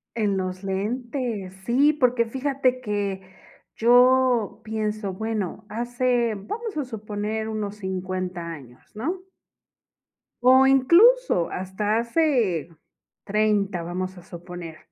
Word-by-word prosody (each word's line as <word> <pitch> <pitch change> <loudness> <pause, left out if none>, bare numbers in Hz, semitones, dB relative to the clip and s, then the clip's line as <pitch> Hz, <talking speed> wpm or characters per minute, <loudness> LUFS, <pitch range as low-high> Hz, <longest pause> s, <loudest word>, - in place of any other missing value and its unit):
En 210 -3 +1
los 185 0 -4
lentes, 215 0 -3
sí, 280 +5 +4
porque 250 -5 +2
fíjate 260 +1 0
que 205 -3 -2 0.5
yo 245 -1 +4
pienso, 215 -2 -3
bueno, 215 0 -4
hace 240 +1 0
vamos 425 - -6
a 295 - -1
suponer, 215 -1 -4
unos 210 -2 -4
50 185 -2 -4
años, 130 -7 -10
¿no? 335 - -3 1.2
O 260 +1 +7
incluso 340 - +5
hasta 205 +4 -2
hace 235 - +1 0.6
30, 205 -3 +1
vamos 185 +2 -4
a 175 - -12
suponer. 175 -2 -9
215 Hz, 105 wpm, -24 LUFS, 190-250 Hz, 1.2 s, O